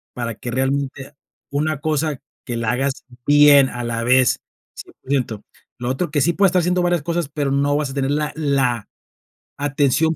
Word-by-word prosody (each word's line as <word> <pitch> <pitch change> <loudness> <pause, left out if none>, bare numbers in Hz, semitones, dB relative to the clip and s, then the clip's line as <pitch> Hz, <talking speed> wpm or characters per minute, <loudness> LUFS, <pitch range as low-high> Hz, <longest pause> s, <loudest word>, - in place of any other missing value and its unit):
para 115 -1 -3
que, 120 - -7
realmente, 135 +2 -2 0.4
una 150 +1 -1
cosa 155 -2 -1 0.3
que 120 -3 -3
la 115 -1 0
hagas 135 +3 0 0.3
bien 145 -2 +7
a 120 0 -5
la 115 -1 -2
vez, 125 +1 +3 0.4
100%. 125 -6 -4 0.4
Lo 120 0 -3
otro, 135 +7 -1
que 145 - +1
sí 170 +5 +2
puedes 195 +1 +4
estar 180 - +2
haciendo 180 +1 +1
varias 175 -3 +1
cosas, 170 -2 -2
pero 145 -2 -2
no 140 +1 +1
vas 145 -2 -1
a - - -8
tener 135 0 -1
la 150 0 0
la 135 -7 0 0.7
atención 145 +2 +1
140 Hz, 175 wpm, -20 LUFS, 130-150 Hz, 0.7 s, bien